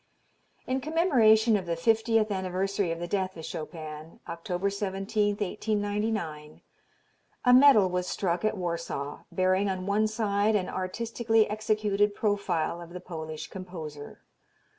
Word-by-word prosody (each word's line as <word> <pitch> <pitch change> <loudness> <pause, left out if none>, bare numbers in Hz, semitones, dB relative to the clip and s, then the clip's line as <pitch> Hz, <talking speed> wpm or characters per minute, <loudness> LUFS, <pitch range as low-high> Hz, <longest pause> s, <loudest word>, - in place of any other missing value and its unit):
In 260 +1 -1
commemoration 240 -9 +4
of 190 -4 -2
the 170 - 0
fiftieth 225 +3 +2
anniversary 190 0 -1
of 165 - -3
the 175 - -4
death 190 -1 -2
of 160 - -7
Chopin, 155 0 -7
October 180 +3 -2
17, 200 +1 -1
1899, 205 -6 -2 0.8
a 250 - +6
medal 255 -7 +7
was 180 0 -2
struck 175 -3 -1
at 215 -1 0
Warsaw, 170 -5 -4
bearing 185 +2 +2
on 185 -1 -3
one 205 +2 +2
side 215 -1 +1
an 190 -3 0
artistically 225 +4 0
executed 210 -1 0
profile 195 -6 -1
of 170 0 -11
the 180 - -6
Polish 160 -3 -6
composer. 160 -6 -8
195 Hz, 130 wpm, -28 LUFS, 175-215 Hz, 0.8 s, medal